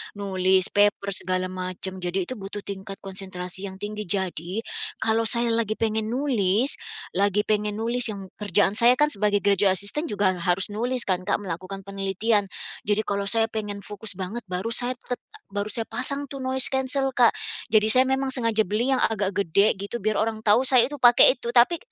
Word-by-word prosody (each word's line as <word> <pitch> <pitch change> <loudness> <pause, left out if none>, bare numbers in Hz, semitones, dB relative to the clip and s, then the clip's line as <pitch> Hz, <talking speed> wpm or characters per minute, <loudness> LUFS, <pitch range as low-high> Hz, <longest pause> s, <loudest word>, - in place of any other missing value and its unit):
nulis 190 -2 +1
paper 205 -1 +1
segala 185 -1 0
macam. 185 +1 -3
Jadi 180 +1 -2
itu 255 - -4
butuh 200 +1 -7
tingkat 195 0 -7
konsentrasi 190 0 -5
yang 190 - -9
tinggi, 210 -1 -6
jadi, 190 +2 -1 0.4
kalau 225 0 +1
saya 235 +1 +1
lagi 225 -2 0
pengen 220 -1 -1
nulis 245 -2 +2 0.4
lagi 200 +1 +2
pengen 210 -1 0
nulis 240 +2 -1
yang 195 -3 -7
kerjaan 205 0 +1
saya 240 +1 +6
kan 295 +3 +2
sebagai 205 -3 +1
graduate 200 -1 +2
assistant 205 - -1
juga 190 -3 0
harus 180 +3 +1
nulis 240 +4 -2
kan 185 -1 -1
Kak 205 - -1
melakukan 190 +1 -6
penelitian, 200 +2 -1 0.4
jadi 210 +1 +1
kalau 200 -1 -3
saya 225 +2 +2
pengen 210 -2 -5
fokus 210 0 -6
banget 195 +5 -6
baru 185 +4 -4
saya 245 +2 +1
tet 245 - -5 0.3
baru 205 0 -3
saya 225 +1 0
pasang 280 +3 -1
tuh 275 - -7
noise 260 0 +1
cancel 265 0 0
Kak, 240 -3 +4 0.4
jadi 215 0 +4
saya 255 +4 +10
memang 265 0 0
sengaja 230 -4 +1
beli 230 +8 0
yang 255 - 0
agak 200 -3 0
gede 200 +2 +2
gitu 200 +4 -4
biar 215 +1 0
orang 220 0 -3
tahu 215 +4 +5
saya 255 -2 +5
itu 290 - -7
pakai 245 +2 +6
itu 235 - -4
tapi, 250 +8 +4
210 Hz, 185 wpm, -24 LUFS, 195-235 Hz, 0.4 s, saya